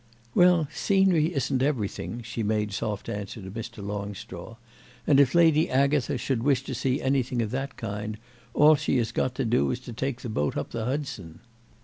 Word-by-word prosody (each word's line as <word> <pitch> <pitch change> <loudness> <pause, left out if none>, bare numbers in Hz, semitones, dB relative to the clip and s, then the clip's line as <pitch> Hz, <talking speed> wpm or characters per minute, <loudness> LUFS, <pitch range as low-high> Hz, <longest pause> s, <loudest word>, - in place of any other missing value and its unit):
"Well, 175 -4 +5
scenery 190 -5 +3
isn't 135 -3 0
everything," 120 -3 -2
she 115 +1 -5
made 105 -1 0
soft 105 0 -3
answer 105 +2 -5
to 95 -2 -8
Mr. 115 -1 -7
Longstraw; 100 0 -6 0.5
"and 140 -2 +5
if 135 0 +4
Lady 160 -2 +5
Agatha 140 +1 +2
should 130 -4 -1
wish 135 0 +2
to - - -5
see 130 0 0
anything 130 -2 0
of 110 -2 -1
that 135 +1 -4
kind 105 0 -4 0.4
all 150 +2 +7
she 145 - +1
has 115 -3 0
got 130 -1 -1
to 135 - -1
do 120 +2 +2
is 125 - -2
to 120 -1 -8
take 125 +1 -3
the - - -5
boat 75 -9 -1
up 75 - -4
the 115 -1 -3
Hudson." 125 - -4
125 Hz, 190 wpm, -26 LUFS, 105-140 Hz, 0.5 s, all